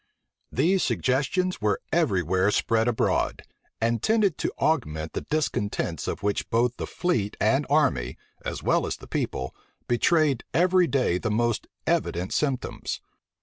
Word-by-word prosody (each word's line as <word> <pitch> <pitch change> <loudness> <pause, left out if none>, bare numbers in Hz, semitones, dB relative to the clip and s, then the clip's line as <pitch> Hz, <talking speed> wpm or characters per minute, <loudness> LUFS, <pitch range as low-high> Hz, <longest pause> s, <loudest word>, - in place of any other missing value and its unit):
These 185 +3 +2
suggestions 135 - 0
were 105 -1 +1
every 115 - +2
where 95 +4 +2
spread 115 +2 +2
abroad, 120 -2 0 0.4
and 115 0 +1
tended 215 -6 +2
to - - -1
augment 80 - 0
the - - -2
discontents 105 - -1
of - - -4
which 100 0 -1
both 120 +1 +1
the - - -4
fleet 125 - -1
and 135 +6 +2
army, 130 - +2 0.3
as - - -4
well - - +2
as - - -3
the - - -12
people, 65 0 -3 0.3
betrayed 140 +2 +2
every 180 +1 +4
day 125 - +1
the 110 - -2
most 120 +1 0 0.2
evident 90 +3 0
symptoms. 135 -4 -2
120 Hz, 145 wpm, -26 LUFS, 100-155 Hz, 0.4 s, every